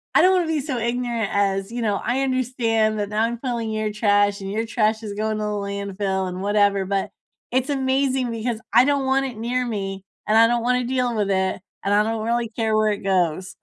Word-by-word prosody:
I - - +7
don't 370 +1 +5
wanna 355 -3 +1
be 320 -2 0
so 265 -3 -3
ignorant 235 -2 -1
as, 195 0 0
you 240 0 -4
know, 210 -3 +1
"I 260 +2 0
understand 230 -4 0
that 205 - -1
now 215 +1 0
I'm 235 +1 -1
filling 235 -4 -3
your 215 0 -1
trash, 205 -1 +2
and 195 0 -5
your 225 +2 -1
trash 220 -1 +1
is 205 -1 -5
going 215 +1 -2
to 215 - -3
the 210 - -1
landfill, 200 -1 -2
and 180 +1 -6
whatever," 205 -1 +2
but 195 0 -1 0.4
it's 260 +2 0
amazing 265 -2 +1
because 230 0 -3
I - - +7
don't 280 -2 +1
want 270 +1 +2
it 235 -4 -8
near 250 +2 -1
me, 195 -3 -4 0.2
and 215 +1 +4
I 230 - +8
don't 240 0 +1
wanna 250 +1 +1
deal 250 -2 0
with 200 -2 0
it, 190 -1 0 0.2
and 200 +1 +1
I 210 - +4
don't 220 0 -2
really 235 0 0
care 220 -1 -1
where 215 0 +3
it 205 - -1
goes. 185 -1 0
220 Hz, 230 wpm, -22 LUFS, 200-245 Hz, 0.4 s, I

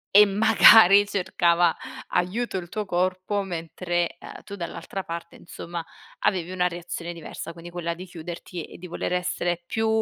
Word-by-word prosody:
e 210 +1 +10
magari 205 -1 +7
cercava 175 -3 +2 0.3
aiuto 190 +5 -1
il 175 -2 -6
tuo 210 +3 -3
corpo. 185 +2 0
Mentre, 175 -1 -3
uhm, - - -11
tu 200 - -8
dall'altra 175 +1 -6
parte, 170 0 -7
insomma, 170 0 -7 0.4
avevi 180 -3 0
una 180 -1 +1
reazione 175 0 -6
diversa, 165 0 -8
quindi 170 +1 -11
quella 170 -1 -3
di 180 +2 -9
chiuderti 175 -1 -7
e - - -13
di 180 - -9
voler 175 - -3
essere 175 -1 -1
più, 220 +5 -1
175 Hz, 155 wpm, -25 LUFS, 170-190 Hz, 0.4 s, e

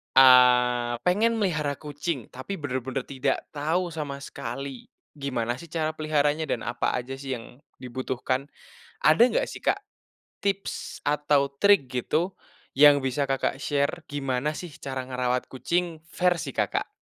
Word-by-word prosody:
eee, 125 -2 +6
pengen 220 +6 +3
melihara 155 -9 0
kucing, 145 -2 -4
tapi 130 +10 -6
bener-bener 130 -3 -3
tidak 135 0 -1
tahu 165 +4 -1
sama 145 -3 -5
sekali, 130 +2 -6 0.3
gimana 125 -4 -2
sih 170 - -10
cara 155 -1 -1
peliharanya 155 0 +1
dan 115 - -1
apa 120 0 -1
aja 125 +2 -4
sih 135 -1 -4
yang 120 +2 -11 0.2
dibutuhkan? 130 +2 -2 0.6
Ada 155 +9 +6
nggak - - +1
sih, - - -9
Kak, 400 - +2 0.6
tips 200 -1 -3
atau 145 -1 +2
trik 200 -8 +5
gitu, 155 +9 0 0.4
yang 145 +1 +8
bisa 135 +2 0
Kakak 135 0 0
share 145 +4 0
gimana 140 +1 -1
sih 175 -5 -7
cara 130 -2 -4
ngerawat 125 -1 -1
kucing 170 +4 -1
versi 175 -5 +1
Kakak? 105 -2 0
140 Hz, 135 wpm, -26 LUFS, 130-155 Hz, 0.6 s, yang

